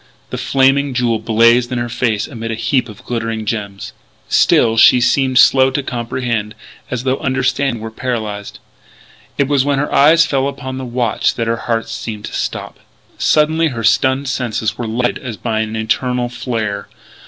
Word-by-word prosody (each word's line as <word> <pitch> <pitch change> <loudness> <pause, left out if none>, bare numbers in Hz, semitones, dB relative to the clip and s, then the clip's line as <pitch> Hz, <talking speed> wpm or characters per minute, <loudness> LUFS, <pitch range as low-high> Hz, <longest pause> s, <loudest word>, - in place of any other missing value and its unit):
The - - -3
Flaming 135 0 +2
Jewel 120 -3 +1
blazed 115 +3 +3
in 125 - -1
her 120 0 -2
face 115 -3 -1
amid 115 -3 -6
a 115 - -2
heap 125 +2 0
of 105 - -12
glittering 115 -2 -3
gems. 100 -3 -4 0.4
Still 115 -1 +4
she 115 +2 +6
seemed 130 +1 +2
slow 130 +1 +6
to 135 +1 -2
comprehend 120 -3 -3 0.3
as 125 -1 -3
though 130 +1 0
understanding 130 -2 -1
were 110 - -6
paralysed. 110 -4 -4 0.8
It 140 - +2
was 140 -2 +2
when 140 0 0
her 145 +2 -2
eyes 160 +4 +6
fell 135 -3 0
upon 130 -1 -5
the 130 - -5
watch 120 -1 0
that 115 - -2
her 115 0 0
heart 115 -1 0
seemed 110 -2 -6
to - - -8
stop. - - -4 0.4
Suddenly 160 +2 +3
her 120 -6 -4
stunned 130 +5 +2
senses 120 -5 -2
were 120 - -4
lighted 120 +2 -1
as 120 -5 -6
by 110 -1 -2
an 110 0 -2
infernal 120 +3 -1
flare.... 110 -5 -3
120 Hz, 175 wpm, -17 LUFS, 115-130 Hz, 0.8 s, she